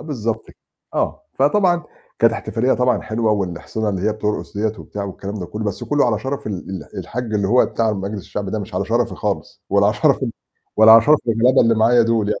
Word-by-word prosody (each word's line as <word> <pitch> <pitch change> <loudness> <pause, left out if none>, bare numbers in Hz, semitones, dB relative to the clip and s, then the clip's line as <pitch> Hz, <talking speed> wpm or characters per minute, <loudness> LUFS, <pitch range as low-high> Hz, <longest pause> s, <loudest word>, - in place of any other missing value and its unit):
آه - - -9
بالضبط، 115 -7 -3 0.5
آه. - - -1
فطبعا 175 +4 +2 0.4
كانت 115 0 +4
احتفالية 115 +3 -1
طبعًا 125 0 +1
حلوة 110 0 0
والإحصنة 100 +3 -3
اللي 95 -2 -2
هي - - +1
بترقُص 105 -1 -4
ديّة 110 +1 0
وبتاع 100 -1 -6
والكلام 100 +1 -6
ده 90 -4 -5
كلّه، 110 +1 -5
بس 100 - -3
كلّه 145 -3 +2
على 110 -3 +1
شرف 135 +2 -5
ال 105 - -2 0.2
ال 95 +1 -7
الحاج 115 +7 -4
اللي 100 -2 0
هو 125 +3 +4
بتاع 110 -2 0
مجلس 100 +1 -4
الشعب 100 -2 -5
ده 110 - -2
مش 100 -1 -7
على 95 +2 0
شرفي 120 +1 0
خالص 105 -2 -4
ولا - - +4
على - - +2
شرف - - +2
ال - - -2 0.4
ولا 110 +1 +8
على 115 0 +9
شرف 150 +4 +5
الغلابة 115 +3 +4
اللي 115 0 +4
معايا 115 +2 +4
دُول 115 -2 +1
يعني. 105 - -1
110 Hz, 225 wpm, -20 LUFS, 105-120 Hz, 0.5 s, على